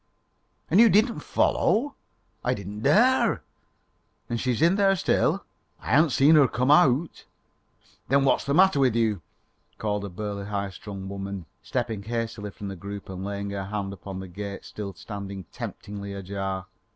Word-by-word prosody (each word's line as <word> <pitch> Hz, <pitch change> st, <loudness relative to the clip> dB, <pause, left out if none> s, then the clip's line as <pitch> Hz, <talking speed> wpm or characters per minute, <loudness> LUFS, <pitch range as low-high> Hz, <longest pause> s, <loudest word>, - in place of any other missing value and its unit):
"And 185 Hz, -, +5 dB
you 230 Hz, 0 st, +8 dB
didn't 220 Hz, +4 st, +3 dB
follow?" 275 Hz, +7 st, +1 dB, 0.5 s
"I 125 Hz, +1 st, +1 dB
didn't 100 Hz, 0 st, -7 dB
dare." 235 Hz, -, +4 dB, 0.9 s
"And 115 Hz, -, -1 dB
she's 125 Hz, -3 st, 0 dB
in 170 Hz, +4 st, +5 dB
there 195 Hz, -1 st, +4 dB
still?" 180 Hz, -, +1 dB, 0.3 s
"I 90 Hz, -, -6 dB
haven't 155 Hz, +6 st, +5 dB
seen 135 Hz, +5 st, +5 dB
her 140 Hz, -3 st, +6 dB
come 125 Hz, +4 st, +1 dB
out." 150 Hz, +2 st, +3 dB, 0.8 s
"Then 140 Hz, +1 st, +3 dB
what's 135 Hz, -, +3 dB
the 140 Hz, -, 0 dB
matter 190 Hz, -4 st, +5 dB
with 130 Hz, -4 st, +3 dB
you?" 110 Hz, -5 st, +1 dB, 0.6 s
called 105 Hz, -2 st, -2 dB
out -, -, -3 dB
a -, -, -8 dB
burly, 100 Hz, +1 st, -5 dB
high 100 Hz, -1 st, -2 dB
strung 95 Hz, +1 st, -8 dB
woman, 100 Hz, -2 st, -5 dB, 0.2 s
stepping 110 Hz, -3 st, -2 dB
hastily 115 Hz, -1 st, -3 dB
from 100 Hz, 0 st, -8 dB
the 95 Hz, -, -6 dB
group 100 Hz, +2 st, -8 dB
and 95 Hz, 0 st, -6 dB
laying 100 Hz, 0 st, -4 dB
her 100 Hz, -1 st, -4 dB
hand 100 Hz, -1 st, -3 dB
upon 95 Hz, 0 st, -7 dB
the 95 Hz, -, -7 dB
gate 100 Hz, +2 st, -7 dB
still 100 Hz, -3 st, -7 dB
standing 100 Hz, -1 st, -7 dB
temptingly 100 Hz, -1 st, -7 dB
ajar. 95 Hz, -1 st, -4 dB
105 Hz, 165 wpm, -26 LUFS, 100-135 Hz, 0.9 s, you